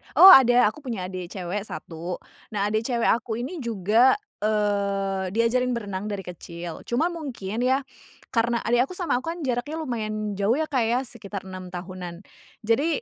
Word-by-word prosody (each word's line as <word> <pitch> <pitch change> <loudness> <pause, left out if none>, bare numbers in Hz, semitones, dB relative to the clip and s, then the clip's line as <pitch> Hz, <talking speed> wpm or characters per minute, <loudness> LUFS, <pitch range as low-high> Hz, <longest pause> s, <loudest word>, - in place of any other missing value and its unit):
Oh 380 - +11
ada 245 - +7
aku 300 - -14
punya 195 -7 -3
adik 185 -2 -5
cewek 190 +2 -3
1. 170 +2 -6 0.4
Nah, 205 0 0
adik 220 +1 0
cewek 235 -2 +1
aku 225 -1 +1
ini 315 +8 -5
juga, 230 +1 +3 0.2
eee, 200 -3 0
diajarin 245 +2 +2
berenang 205 -3 -4
dari 200 -2 -4
kecil, 175 -1 -8
cuma 290 +9 +1
mungkin 240 - -5
ya, 265 +2 +2 0.5
karena 235 0 +1
adik 240 +3 +3
aku - - -8
sama 340 -9 0
aku 255 - -10
kan 345 - -10
jaraknya 260 +3 -2
lumayan 215 -6 -3
jauh 205 +4 +3
ya, 315 +1 -1
Kak, 255 -4 +2
ya, 240 +3 +2
sekitar 210 -5 -8
6 185 -1 -7
tahunan. 180 0 -7 0.4
Jadi 275 +8 +1
220 Hz, 170 wpm, -25 LUFS, 195-250 Hz, 0.5 s, Oh